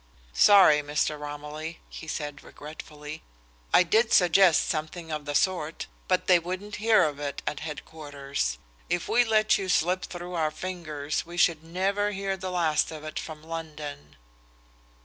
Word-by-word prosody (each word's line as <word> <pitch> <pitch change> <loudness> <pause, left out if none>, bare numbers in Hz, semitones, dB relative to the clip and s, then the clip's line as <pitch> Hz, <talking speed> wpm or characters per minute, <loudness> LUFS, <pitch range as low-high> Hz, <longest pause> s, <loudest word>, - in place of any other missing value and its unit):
"Sorry, 155 - +7
Mr. 150 +1 -1
Romilly," 150 +2 -6
he 160 - -10
said 145 -2 -4
regretfully. 150 0 -9 0.5
"I - - +6
did 220 +7 +2
suggest 180 -1 +5
something 160 +1 -4
of 150 -1 -4
the 145 0 -3
sort, 165 -3 0 0.2
but 185 -1 +1
they 180 -2 +6
wouldn't 185 +4 -5
hear 220 0 +4
of 145 -2 -1
it 140 -1 -4
at 150 - -2
headquarters. 145 - -4 0.3
If 175 0 -1
we 245 +1 +4
let 215 -2 +3
you 190 -1 -4
slip 180 +1 +2
through 175 0 -7
our 160 -3 +1
fingers, 155 -4 -4
we 170 +1 -10
should 165 -3 +3
never 195 +5 0
hear 195 0 -2
the 185 0 -5
last 165 -4 +1
of 155 -1 -8
it 155 - -5
from 155 -1 -8
London." 150 - -7
160 Hz, 155 wpm, -27 LUFS, 150-185 Hz, 0.5 s, Sorry